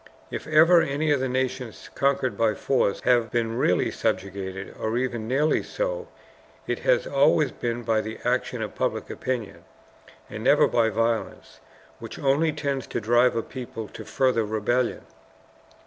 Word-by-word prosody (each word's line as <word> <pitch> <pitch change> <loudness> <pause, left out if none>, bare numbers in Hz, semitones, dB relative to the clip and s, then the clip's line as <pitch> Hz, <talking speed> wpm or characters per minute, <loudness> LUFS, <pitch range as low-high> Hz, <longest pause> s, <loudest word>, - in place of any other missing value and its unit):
If - - -5
ever 165 +3 +6
any 150 +2 0
of 145 - +3
the 130 0 -1
nations 130 -2 -3
conquered 135 -2 +1
by 110 -2 +1
force 115 -3 0
have 120 -2 +3
been 115 0 -1
really 90 -8 +2
subjugated, 95 0 -3
or 110 +2 -1
even 120 -3 -2
nearly 145 +5 +2
so, - - -3 0.6
it - - -2
has - - +2
always 145 +1 +3
been 120 0 -3
by 110 -1 +1
the 110 +1 -6
action 125 -1 0
of 105 - -6
public - - -2
opinion, 125 -5 -4 0.6
and - - -7
never - - +5
by 115 -2 +2
violence, 115 0 -2 0.4
which - - -8
only 145 +4 +2
tends 140 -4 -3
to - - -3
drive 120 +3 +3
a 115 - -1
people 120 -4 -7
to - - -9
further 130 -4 +1
rebellion. 110 +4 0
125 Hz, 155 wpm, -25 LUFS, 115-140 Hz, 0.6 s, ever